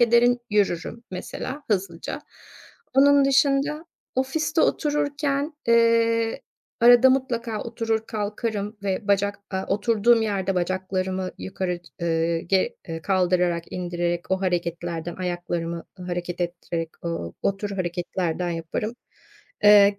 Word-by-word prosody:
ederim, 240 Hz, +1 st, +5 dB
yürürüm 205 Hz, +2 st, 0 dB
mesela 260 Hz, +9 st, -5 dB
hızlıca. 185 Hz, -4 st, -2 dB, 0.7 s
Onun 280 Hz, +1 st, +6 dB
dışında 275 Hz, +3 st, +2 dB, 0.3 s
ofiste 305 Hz, +5 st, +1 dB
otururken, 290 Hz, 0 st, 0 dB
eee, 230 Hz, -1 st, +3 dB, 0.4 s
arada 245 Hz, +2 st, +8 dB
mutlaka 235 Hz, -4 st, -1 dB
oturur 225 Hz, -1 st, -2 dB
kalkarım 210 Hz, 0 st, -3 dB
ve 200 Hz, +1 st, -2 dB
bacak 200 Hz, 0 st, +2 dB
a 190 Hz, -1 st, -2 dB
oturduğum 225 Hz, +3 st, +3 dB
yerde 195 Hz, -3 st, 0 dB
bacaklarımı 185 Hz, +1 st, -1 dB
yukarı 175 Hz, -, -3 dB
çı -, -, -17 dB
eee, 165 Hz, 0 st, +1 dB
ge 190 Hz, +2 st, +1 dB
eee, 165 Hz, 0 st, -5 dB
kaldırarak 180 Hz, -2 st, +2 dB
indirerek 175 Hz, -1 st, -2 dB
o 190 Hz, 0 st, +1 dB
hareketlerden 170 Hz, -2 st, -2 dB
ayaklarımı, 175 Hz, -2 st, -3 dB, 0.2 s
ııı, 180 Hz, -, -7 dB
hareket 175 Hz, 0 st, -3 dB
ettirerek, 170 Hz, -1 st, -3 dB
ooo, 165 Hz, -, -3 dB
o 200 Hz, -, +1 dB
tür 205 Hz, +1 st, -4 dB
hareketlerden 175 Hz, -2 st, -2 dB
yaparım. 170 Hz, +7 st, -3 dB, 0.7 s
Eee, 205 Hz, -1 st, +7 dB
195 Hz, 115 wpm, -24 LUFS, 175-235 Hz, 0.7 s, arada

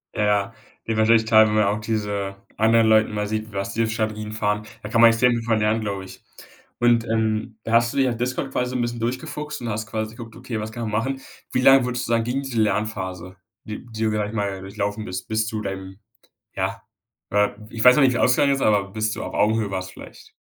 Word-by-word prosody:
Ja, 105 Hz, -, 0 dB
ja, 105 Hz, +1 st, +1 dB, 0.3 s
dir -, -, -8 dB
wird 110 Hz, -, 0 dB
wahrscheinlich 110 Hz, 0 st, +4 dB
klar, 110 Hz, -1 st, +6 dB
wenn 105 Hz, -, -1 dB
man 110 Hz, -, +4 dB
auch 105 Hz, +1 st, 0 dB
diese 105 Hz, -3 st, -2 dB, 0.2 s
anderen 115 Hz, +1 st, +4 dB
Leuten 110 Hz, 0 st, +4 dB
mal 105 Hz, 0 st, -1 dB
sieht, 110 Hz, +1 st, -3 dB
was 100 Hz, 0 st, -3 dB
die 115 Hz, +1 st, +1 dB
für -, -, -3 dB
Strategien 110 Hz, -1 st, -3 dB
fahren. 105 Hz, -1 st, -1 dB, 0.2 s
Da 105 Hz, -, -6 dB
kann 115 Hz, +1 st, +3 dB
man 115 Hz, -, +10 dB
extrem 115 Hz, +2 st, +3 dB
viel 115 Hz, -, 0 dB
von 115 Hz, -1 st, +1 dB
lernen, 110 Hz, +1 st, +1 dB
glaube 100 Hz, -2 st, -4 dB
ich. 95 Hz, -, -13 dB, 0.6 s
Und, 120 Hz, -1 st, +4 dB
ähm, 110 Hz, 0 st, -1 dB
da 115 Hz, -, -3 dB
hast 120 Hz, +2 st, +4 dB
du -, -, -5 dB
dich 135 Hz, -2 st, +3 dB
auf 120 Hz, -, -3 dB
Discord 125 Hz, +2 st, -2 dB
quasi 125 Hz, -1 st, -1 dB
so -, -, -5 dB
'n 125 Hz, -, 0 dB
bisschen 120 Hz, 0 st, -2 dB
durchgefuchst 130 Hz, +5 st, -4 dB
und 120 Hz, -, -4 dB
hast 110 Hz, 0 st, -3 dB
quasi 110 Hz, 0 st, -4 dB
geguckt: 115 Hz, -1 st, -10 dB
„Okay, 120 Hz, -2 st, -5 dB
was 110 Hz, +1 st, -5 dB
kann 120 Hz, +1 st, -6 dB
man 110 Hz, -, -3 dB
machen?“ 135 Hz, +6 st, -1 dB, 0.3 s
Wie -, -, +1 dB
lange 135 Hz, 0 st, +7 dB
würdest 125 Hz, -1 st, -2 dB
du -, -, -3 dB
sagen 115 Hz, -1 st, +2 dB
ging 125 Hz, +3 st, -1 dB
diese 120 Hz, -4 st, -1 dB
Lernphase, 95 Hz, -4 st, -2 dB, 0.3 s
die 110 Hz, +3 st, -7 dB
die 110 Hz, 0 st, -3 dB
du 110 Hz, -, +2 dB
da, 105 Hz, -, -1 dB
sage 105 Hz, -1 st, -1 dB
ich 110 Hz, -, -8 dB
mal, 100 Hz, -2 st, -2 dB
durchlaufen 100 Hz, +2 st, -3 dB
bist, 90 Hz, -1 st, -5 dB
bis 110 Hz, 0 st, 0 dB
zu 110 Hz, -1 st, -3 dB
deinem, 95 Hz, -1 st, -6 dB, 0.6 s
ja, -, -, -3 dB, 0.5 s
äh 105 Hz, 0 st, +3 dB, 0.2 s
ich 115 Hz, -1 st, -2 dB
weiß 125 Hz, 0 st, +9 dB
noch 150 Hz, -, +4 dB
nicht, 130 Hz, -1 st, +5 dB
wie's -, -, 0 dB
ausgegangen 140 Hz, +3 st, +4 dB
ist, 135 Hz, -, -3 dB
aber 100 Hz, -2 st, +2 dB
bis 110 Hz, +1 st, -1 dB
du -, -, -5 dB
auf -, -, -5 dB
Augenhöhe 110 Hz, 0 st, +1 dB
warst 95 Hz, -1 st, -4 dB
vielleicht? -, -, -13 dB
110 Hz, 250 wpm, -23 LUFS, 105-115 Hz, 0.6 s, man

